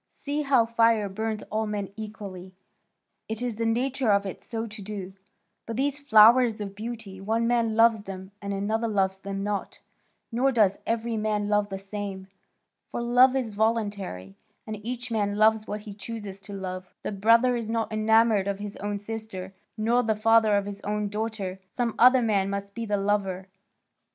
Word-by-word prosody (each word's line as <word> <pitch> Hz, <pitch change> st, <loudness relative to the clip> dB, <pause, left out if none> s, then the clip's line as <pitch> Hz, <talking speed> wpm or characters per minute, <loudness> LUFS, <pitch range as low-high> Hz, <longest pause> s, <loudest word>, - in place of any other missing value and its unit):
See 290 Hz, +1 st, -3 dB
how 270 Hz, -5 st, +4 dB
fire 230 Hz, -2 st, +3 dB
burns 215 Hz, +2 st, -3 dB
all 220 Hz, +1 st, 0 dB
men 205 Hz, -2 st, -3 dB
equally; 200 Hz, -4 st, -8 dB, 0.7 s
it 220 Hz, +2 st, -4 dB
is 240 Hz, -4 st, -2 dB
the 230 Hz, 0 st, 0 dB
nature 255 Hz, +2 st, 0 dB
of 200 Hz, -1 st, +3 dB
it 190 Hz, -, -6 dB
so 225 Hz, -1 st, -4 dB
to 215 Hz, -1 st, -9 dB
do; 195 Hz, -2 st, -6 dB, 0.5 s
but 225 Hz, -, -4 dB
these 280 Hz, +2 st, 0 dB
flowers 235 Hz, -3 st, +6 dB
of 200 Hz, -2 st, -5 dB
beauty, 215 Hz, -3 st, -7 dB
one 225 Hz, +3 st, 0 dB
man 230 Hz, -2 st, +1 dB
loves 225 Hz, -2 st, +4 dB
them, 190 Hz, 0 st, -8 dB
and 200 Hz, 0 st, -4 dB
another 215 Hz, +4 st, -1 dB
loves 190 Hz, -3 st, 0 dB
them 195 Hz, 0 st, -4 dB
not, 205 Hz, -1 st, -3 dB, 0.5 s
nor 255 Hz, +4 st, +2 dB
does 210 Hz, -5 st, +3 dB
every 230 Hz, 0 st, -1 dB
man 210 Hz, -1 st, -1 dB
love 210 Hz, 0 st, +2 dB
the 195 Hz, -, -4 dB
same. 195 Hz, -1 st, -6 dB, 0.6 s
For -, -, -5 dB
love 245 Hz, +2 st, +5 dB
is 245 Hz, -5 st, -1 dB
voluntary, 205 Hz, -, -1 dB, 0.3 s
and 215 Hz, -1 st, -6 dB
each 245 Hz, +1 st, -5 dB
man 205 Hz, -2 st, 0 dB
loves 215 Hz, +1 st, +3 dB
what 210 Hz, +1 st, -4 dB
he 210 Hz, -1 st, -9 dB
chooses 205 Hz, -2 st, -7 dB
to 205 Hz, -, -10 dB
love. 185 Hz, -1 st, -6 dB
The -, -, -3 dB
brother 230 Hz, +5 st, +4 dB
is 230 Hz, -2 st, -3 dB
not 225 Hz, -1 st, -1 dB
enamoured 220 Hz, -2 st, +3 dB
of 200 Hz, -1 st, -1 dB
his 205 Hz, 0 st, -7 dB
own 205 Hz, +1 st, -3 dB
sister, 205 Hz, -3 st, -6 dB, 0.2 s
nor 230 Hz, +3 st, +2 dB
the 220 Hz, -2 st, 0 dB
father 220 Hz, 0 st, +4 dB
of 200 Hz, -, -1 dB
his 200 Hz, 0 st, -7 dB
own 210 Hz, 0 st, -2 dB
daughter; 210 Hz, -3 st, -4 dB
some 235 Hz, +3 st, -1 dB
other 250 Hz, +1 st, +7 dB
man 200 Hz, -3 st, +1 dB
must 200 Hz, 0 st, -4 dB
be 230 Hz, +1 st, -5 dB
the 205 Hz, 0 st, +1 dB
lover. 195 Hz, -2 st, -1 dB
215 Hz, 180 wpm, -26 LUFS, 200-230 Hz, 0.7 s, other